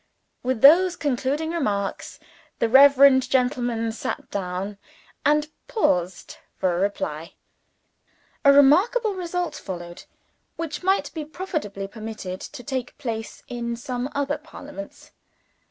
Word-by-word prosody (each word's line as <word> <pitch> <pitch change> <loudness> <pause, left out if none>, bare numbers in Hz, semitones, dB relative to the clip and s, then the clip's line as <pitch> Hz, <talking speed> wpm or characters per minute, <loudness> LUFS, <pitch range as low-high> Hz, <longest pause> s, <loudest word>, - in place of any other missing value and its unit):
With 255 -2 -2
those 345 +6 +7
concluding 290 +3 -1
remarks, 205 - -2 0.4
the 230 - +1
reverend 270 0 +7
gentleman 245 -3 0
sat 225 - -5
down 195 +1 -4 0.4
and 300 +1 +3 0.2
paused 180 - -1 0.2
for 180 -2 +1
a - - -1
reply. 165 -5 -3 1.1
A 280 - +8
remarkable 385 - +5
result 360 -1 -3
followed, 175 -2 -8 0.5
which 325 -3 -5
might 370 -6 +1
be 315 -2 -4
profitably 300 - -5
permitted 215 -3 -7
to 275 -4 -9
take 260 -3 -4
place 225 -6 -5
in 235 -1 -4
some 250 +1 -4
other 285 0 -1
Parliaments. 290 -8 -11
260 Hz, 115 wpm, -24 LUFS, 210-300 Hz, 1.1 s, A